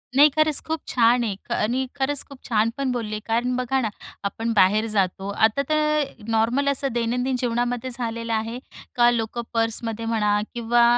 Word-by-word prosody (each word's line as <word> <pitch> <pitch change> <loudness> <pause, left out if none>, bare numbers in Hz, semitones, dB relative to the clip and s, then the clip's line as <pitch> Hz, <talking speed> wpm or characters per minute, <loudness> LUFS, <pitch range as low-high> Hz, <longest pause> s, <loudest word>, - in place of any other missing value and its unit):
नाही, 290 +2 +8
खरंच 310 -1 +3
खूप 320 0 -2
छान 240 0 +3
आहे. 210 -4 -2
ख - - -9
आणि 245 +5 0
खरंच 280 0 -1
खूप 275 - -11
छान 220 0 +3
पण 275 -2 0
बोलले 215 -3 -3
कारण 240 +2 0
बघा 255 +1 0
ना, 220 - -1 0.3
आपण 225 +3 -2
बाहेर 205 +2 +4
जातो. 195 -2 -1
आता 220 +5 +2
तर 305 -1 +2 0.3
नॉर्मल 230 +5 +1
असं 275 0 0
दैनंदिन 245 +2 0
जीवनामध्ये 245 0 -1
झालेलं 230 -2 -3
आहे, 225 +3 -2 0.4
का 240 -1 +5
लोक 230 0 -2
पर्समध्ये 225 0 -1
म्हणा 210 -2 +1
किंवा 235 0 +2
235 Hz, 170 wpm, -23 LUFS, 225-255 Hz, 0.4 s, नाही